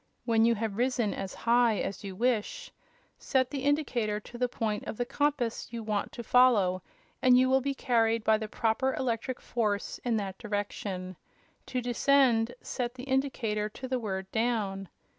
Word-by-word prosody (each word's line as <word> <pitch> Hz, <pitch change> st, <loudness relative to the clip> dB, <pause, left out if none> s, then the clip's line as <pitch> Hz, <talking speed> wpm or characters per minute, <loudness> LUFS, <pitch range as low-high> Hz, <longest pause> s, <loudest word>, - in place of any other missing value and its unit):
When 225 Hz, -1 st, +4 dB
you 235 Hz, 0 st, +4 dB
have 215 Hz, -2 st, -3 dB
risen 245 Hz, -3 st, +1 dB
as 195 Hz, -1 st, -5 dB
high 235 Hz, -2 st, +3 dB
as 195 Hz, +1 st, -4 dB
you 195 Hz, -2 st, -6 dB
wish, 250 Hz, -, -1 dB, 0.5 s
set 260 Hz, -2 st, +1 dB
the 275 Hz, -2 st, -3 dB
indicator 255 Hz, -8 st, 0 dB
to 240 Hz, -, -11 dB
the 250 Hz, -1 st, +1 dB
point 215 Hz, -3 st, -2 dB
of -, -, -5 dB
the 245 Hz, -, -1 dB
compass 270 Hz, -4 st, -1 dB
you 230 Hz, -1 st, -5 dB
want 210 Hz, -2 st, -2 dB
to 235 Hz, -, -6 dB
follow 215 Hz, -7 st, +4 dB, 0.4 s
and 250 Hz, -1 st, +6 dB
you 255 Hz, +1 st, +4 dB
will 265 Hz, 0 st, +4 dB
be 275 Hz, +1 st, -2 dB
carried 230 Hz, -3 st, +1 dB
by 220 Hz, 0 st, +3 dB
the 220 Hz, -, -4 dB
proper 230 Hz, +5 st, 0 dB
electric 245 Hz, 0 st, -2 dB
force 210 Hz, -4 st, -2 dB
in 235 Hz, -2 st, +1 dB
that 195 Hz, -2 st, -4 dB
direction. 200 Hz, -4 st, -4 dB, 0.5 s
To 255 Hz, -, -2 dB
descend, 245 Hz, -1 st, +3 dB
set 245 Hz, -1 st, -3 dB
the 255 Hz, -, -8 dB
indicator 255 Hz, -6 st, -1 dB
to 260 Hz, +5 st, -8 dB
the 255 Hz, -1 st, -1 dB
word 190 Hz, -4 st, -3 dB
'down.' 210 Hz, -5 st, -1 dB
230 Hz, 175 wpm, -29 LUFS, 210-255 Hz, 0.5 s, and